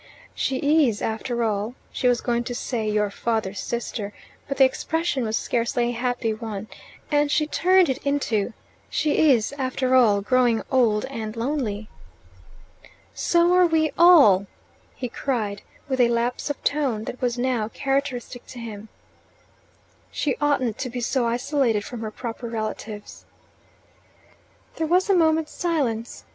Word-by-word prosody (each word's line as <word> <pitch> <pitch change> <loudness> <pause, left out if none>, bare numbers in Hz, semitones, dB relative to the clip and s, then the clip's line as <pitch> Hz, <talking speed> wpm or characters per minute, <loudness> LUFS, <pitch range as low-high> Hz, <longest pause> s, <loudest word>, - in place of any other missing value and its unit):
"She 285 +3 +2
is, 215 -3 -2
after 235 +2 -2
all 215 +2 -1
" - - -34
She 250 - 0
was 245 -1 +2
going 240 -1 0
to 245 - -4
say 230 -3 -2
"your 210 -1 +1
father's 210 -3 -2
sister," 215 -2 -4 0.3
but 275 - -3
the 270 - +7
expression 310 +1 -1
was 220 0 0
scarcely 240 0 0
a - - -1
happy 245 -1 -1
one, 215 -2 -6 0.4
and 295 0 +3
she 305 +1 +2
turned 365 +3 +3
it 265 - -1
into, 245 -7 -1 0.4
"She 310 0 +2
is, 235 +1 +1
after 260 0 0
all, 220 -6 +5
growing 240 +1 +2
old 230 -5 +3
and 225 -5 -6
lonely." 230 -4 -2 1.3
"So 345 +1 +3
are 365 -1 +5
we 315 -2 +2
all!" 280 - +7 0.5
he 250 - -4
cried, 220 -5 -3 0.3
with 260 -2 +1
a 240 - +5
lapse 235 +4 -1
of 290 - -4
tone 270 -7 0
that 250 - -7
was 245 -1 0
now 245 -3 0
characteristic 265 -1 -2
in 240 - -7
him. 215 -2 -8 1.2
"She 285 - -1
oughtn't 260 -6 +1
to 255 - -3
be 245 0 -5
so 240 0 0
isolated 240 -3 0
from 240 -2 -7
her 220 - -3
proper 235 +1 -6
relatives." 215 -2 -6 1.5
There 320 - -1
was 370 +4 +3
a - - +5
moment's 320 -2 +2
silence. 255 -10 -2
245 Hz, 150 wpm, -24 LUFS, 225-280 Hz, 1.5 s, the